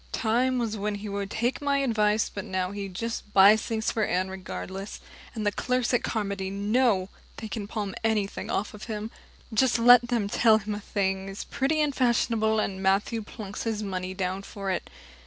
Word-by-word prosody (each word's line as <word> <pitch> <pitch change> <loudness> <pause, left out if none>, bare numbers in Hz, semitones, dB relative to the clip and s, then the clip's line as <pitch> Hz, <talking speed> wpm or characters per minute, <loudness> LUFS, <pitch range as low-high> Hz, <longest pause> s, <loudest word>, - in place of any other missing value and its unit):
Time 250 +3 +1
was 230 -3 -1
when 210 +1 -2
he 205 +1 -6
would 200 -1 -3
take 235 +6 -1
my 285 -1 +1
advice, 220 -5 +2
but 200 - -6
now 185 0 -2
he 200 -1 -5
just 215 +2 -5
buys 200 +3 +7
things 220 -1 -1
for 220 - 0
Anne 185 -1 0
regardless, 190 +1 -6 0.4
and 215 -2 -3
the 205 - +3
clerks 250 +3 0
at 245 - +3
Carmody 200 -3 -2
know 200 0 +1 0.3
they 220 - -6
can 210 -2 -5
palm 205 -3 -3
anything 215 -3 -1
off 205 - -1
on 210 - -10
him. 215 0 -5 0.4
Just 245 +2 +3
let 240 +1 +7
them 235 -4 0
tell 220 +1 +4
him 210 0 -4
a 205 - -4
thing 195 -1 -2
is 195 - -6
pretty 290 +4 0
and 295 -2 +1
fashionable, 225 -3 +2
and 190 -2 -2
Matthew 195 +4 +1
plunks 210 -1 -7
his 220 -2 -2
money 185 -1 -4
down 190 0 -2
for 195 -1 -5
it. 185 - -3
210 Hz, 195 wpm, -27 LUFS, 195-230 Hz, 0.4 s, buys